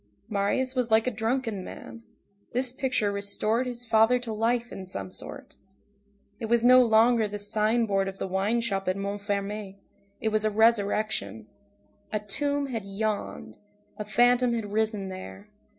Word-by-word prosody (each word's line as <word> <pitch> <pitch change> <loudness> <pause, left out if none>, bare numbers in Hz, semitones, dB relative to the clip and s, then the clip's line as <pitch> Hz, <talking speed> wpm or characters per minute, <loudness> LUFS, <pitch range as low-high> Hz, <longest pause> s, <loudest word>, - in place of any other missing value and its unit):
Marius 215 +6 0
was 250 -3 -1
like 220 0 +4
a 255 - 0
drunken 225 -2 -2
man; 230 - -10 0.5
this 250 +1 +1
picture 255 -6 0
restored 215 +4 0
his 245 -1 -6
father 225 +2 +4
to 240 -3 -5
life 235 +2 0
in 190 -1 -8
some 185 0 -6
sort; - - -8 0.8
it 225 - -4
was 235 +1 +2
no 255 +1 +8
longer 225 0 +4
the 205 0 -5
signboard 210 -1 +1
of 195 0 -6
the - - -3
wine 195 +5 0
shop 195 -4 -2
at 185 +1 0
Montfermeil, 200 0 -3 0.4
it 220 - 0
was 215 0 +1
a 215 - +3
resurrection; 215 - +1 0.7
a 215 - 0
tomb 285 +8 -1
had 225 -4 -3
yawned, 205 +2 -4 0.4
a - - -2
phantom 240 +3 +3
had 210 -3 -4
risen 215 -3 0
there. 190 +2 -9
220 Hz, 155 wpm, -27 LUFS, 200-235 Hz, 0.8 s, no